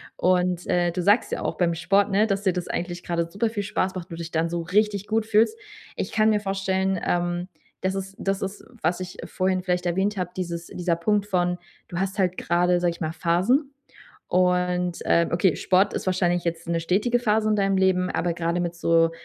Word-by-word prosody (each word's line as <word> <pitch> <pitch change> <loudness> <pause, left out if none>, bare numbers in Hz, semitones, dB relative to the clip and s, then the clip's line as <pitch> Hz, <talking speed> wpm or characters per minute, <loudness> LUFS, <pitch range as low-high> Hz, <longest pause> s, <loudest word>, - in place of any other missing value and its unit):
Und, 180 -1 +1
äh, 175 -1 +2
du 180 - -1
sagst 205 +6 +3
ja - - -2
auch - - -3
beim 170 -2 +2
Sport, 195 +4 +2
ne, 210 +3 +3
dass 200 -1 -1
dir 190 - +2
das 180 -1 -4
eigentlich 175 0 -4
gerade 170 -1 -1
super 210 +5 -1
viel 205 -2 -3
Spaß 195 -2 -1
macht, 180 +1 -6
du 165 - -6
dich 170 0 -7
dann 165 +1 0
so 170 0 -2
richtig 200 +3 +1
gut 220 0 0
fühlst. 225 - +3 0.4
Ich - - -3
kann 215 -1 +4
mir 210 -1 +3
vorstellen, 195 -1 -1
ähm, 175 +1 -1 0.3
das 190 +1 0
ist 195 0 -5
das 195 0 -1
ist, 195 +1 -5 0.2
was 175 +3 0
ich 180 -1 -7
vorhin 185 0 0
vielleicht 180 -1 -1
erwähnt 190 +4 0
habe, 180 -2 -2
dieses 170 -2 -4
dieser 175 -1 -1
Punkt 205 +4 +1
von, 180 -2 +1 0.3
du 170 - -5
hast 195 0 -2
halt 185 -2 +1
gerade, 175 +1 +2
sage 175 -1 +1
ich 170 - -11
mal, 160 -1 -1
Phasen. 190 - +1 0.6
Und, 180 -1 +1
ähm, 170 0 +3
okay, 175 0 +2
Sport 190 +2 +2
ist - - -4
wahrscheinlich 175 -1 +1
jetzt 165 0 -3
'ne 170 0 0
stetige 205 +9 +1
Phase 215 -2 +1
in 215 - +3
deinem 195 -1 +2
Leben, 185 -1 +2
aber 170 -1 0
gerade 170 +1 -1
mit 175 -1 -2
so, 165 -1 +3
180 Hz, 215 wpm, -24 LUFS, 175-195 Hz, 0.6 s, kann